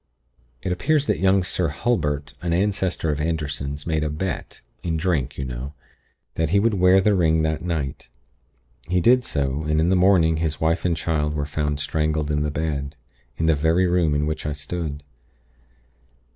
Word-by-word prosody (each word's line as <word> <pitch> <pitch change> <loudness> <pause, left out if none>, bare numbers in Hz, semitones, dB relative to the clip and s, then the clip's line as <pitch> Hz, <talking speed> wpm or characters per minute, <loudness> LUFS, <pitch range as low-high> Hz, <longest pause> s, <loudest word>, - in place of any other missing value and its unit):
"It 95 - -2
appears 145 - +1
that - - 0
young 95 0 +3
Sir 90 -1 0
Hulbert, 75 - -1
an 85 -2 -1
ancestor 95 -3 0
of 75 0 -2
Anderson's, 75 -3 -3
made 80 -2 0
a 75 - -1
bet, 85 +5 -4 0.2
in 80 -2 -1
drink, 75 -5 -1
you 70 - -3
know, 65 +3 -6 0.6
that 80 -1 0
he 100 +4 +3
would 115 +2 +2
wear 90 0 +5
the 105 +2 +3
ring 80 -4 +3
that 80 0 -1
night. 75 -8 -3 0.8
He 90 +1 +1
did 125 +7 +4
so, 70 - -1
and 75 0 +1
in 80 +2 +2
the 95 - +3
morning 90 -4 +4
his 80 -2 -2
wife 80 +2 +1
and 85 -2 +1
child 75 -1 -1
were 75 -1 -1
found 75 -1 -2
strangled 75 0 -1
in 75 0 +1
the 75 - 0
bed, 75 -1 -3 0.4
in 80 - 0
the 80 - +4
very 80 +5 +2
room 85 -4 +2
in 75 +1 +1
which 80 0 -3
I 75 - -1
stood. 75 -1 -5
80 Hz, 185 wpm, -23 LUFS, 75-90 Hz, 0.8 s, wear